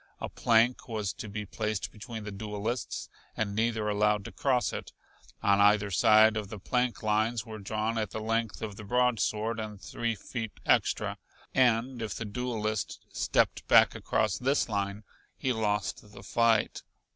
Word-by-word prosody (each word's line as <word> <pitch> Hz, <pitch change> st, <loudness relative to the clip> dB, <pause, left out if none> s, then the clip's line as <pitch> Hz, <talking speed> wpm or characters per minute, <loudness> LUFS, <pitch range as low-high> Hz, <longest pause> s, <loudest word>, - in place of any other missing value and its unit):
A -, -, -4 dB
plank 115 Hz, +2 st, +2 dB
was 110 Hz, -4 st, -2 dB
to 110 Hz, -, -7 dB
be 105 Hz, +1 st, -4 dB
placed 105 Hz, 0 st, -3 dB
between 110 Hz, 0 st, -8 dB
the 105 Hz, -, -6 dB
duelists, 105 Hz, +4 st, -4 dB, 0.3 s
and 105 Hz, -2 st, -1 dB
neither 110 Hz, 0 st, 0 dB
allowed 105 Hz, -1 st, +2 dB
to -, -, -7 dB
cross 130 Hz, -3 st, +1 dB
it. -, -, -6 dB, 0.5 s
On 100 Hz, 0 st, +4 dB
either 105 Hz, 0 st, +4 dB
side 110 Hz, +4 st, +6 dB
of 105 Hz, -2 st, -4 dB
the 105 Hz, -, -6 dB
plank 125 Hz, +5 st, -1 dB
lines 110 Hz, +1 st, +1 dB
were 110 Hz, -1 st, -8 dB
drawn 110 Hz, +3 st, -1 dB
at 110 Hz, -, -1 dB
the -, -, -5 dB
length 115 Hz, 0 st, -1 dB
of 105 Hz, -2 st, -5 dB
the 110 Hz, -, -8 dB
broadsword 115 Hz, -1 st, +1 dB
and 105 Hz, -2 st, -6 dB
three 115 Hz, +3 st, -2 dB
feet 110 Hz, +2 st, -5 dB
extra, -, -, +2 dB, 0.3 s
and 125 Hz, 0 st, +2 dB
if 110 Hz, -2 st, -3 dB
the 115 Hz, -, -4 dB
duelist 110 Hz, -1 st, -3 dB
stepped -, -, +1 dB
back -, -, +6 dB
across 105 Hz, -3 st, 0 dB
this 135 Hz, +3 st, +1 dB
line 100 Hz, -1 st, -2 dB, 0.3 s
he 130 Hz, -, 0 dB
lost 105 Hz, -1 st, -2 dB
the -, -, -11 dB
fight. 115 Hz, -2 st, +2 dB
110 Hz, 165 wpm, -29 LUFS, 105-115 Hz, 0.5 s, side